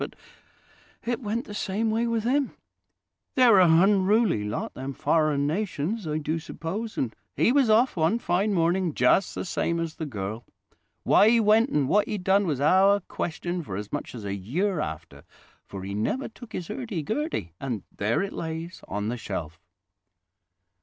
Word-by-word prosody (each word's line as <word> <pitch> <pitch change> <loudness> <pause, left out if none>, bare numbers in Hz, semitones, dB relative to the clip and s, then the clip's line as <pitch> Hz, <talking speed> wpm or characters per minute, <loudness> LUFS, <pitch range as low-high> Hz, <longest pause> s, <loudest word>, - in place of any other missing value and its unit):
But - - -5 0.9
it 240 0 -1
went 225 +2 -2
the 210 - -9
same 205 +2 -1
way 230 +2 +1
with 230 -2 0
him. 270 +3 0 0.8
They're 240 -6 +6
a 180 - +6
hunruly 190 - +4
lot, - - -4
them 135 +1 -5
foreign 155 -1 +1
nations, 180 +3 -2
I 150 0 -1
do 155 +2 -2
suppose, 200 +8 -5
and 120 -4 -2 0.2
he - - +3
was 270 -3 +3
off 230 +4 +4
one 165 +6 +2
fine 200 -1 0
morning 175 -2 +1
just 125 +10 +3
the - - -3
same 170 -1 -1
as 165 -1 -4
the 160 - -4
girl. 110 -1 -5 0.6
Why 210 - +6
he 235 0 +5
went 220 +3 +4
and 145 - +1
what 205 +7 +3
he 210 - -2
done 195 +1 +2
was 145 -5 -1
our 190 +7 +4
question 175 0 -4
for 100 - -6
as 105 +3 -7
much 145 - -4
as 110 -4 -7
a 100 - -2
year 155 - -1
after; 75 - -6 0.4
for 95 -1 -7
he 100 +1 -5
never 110 - -1
took 230 0 -13
his 175 - -5
'urdy 215 - -4
gurdy, 220 - -2
and 120 -7 -4
there 110 - 0
it 195 - -5
lays 165 +2 -5
on 105 +2 -3
the 120 - -3
shelf." 85 -7 -5
175 Hz, 180 wpm, -26 LUFS, 135-215 Hz, 0.9 s, They're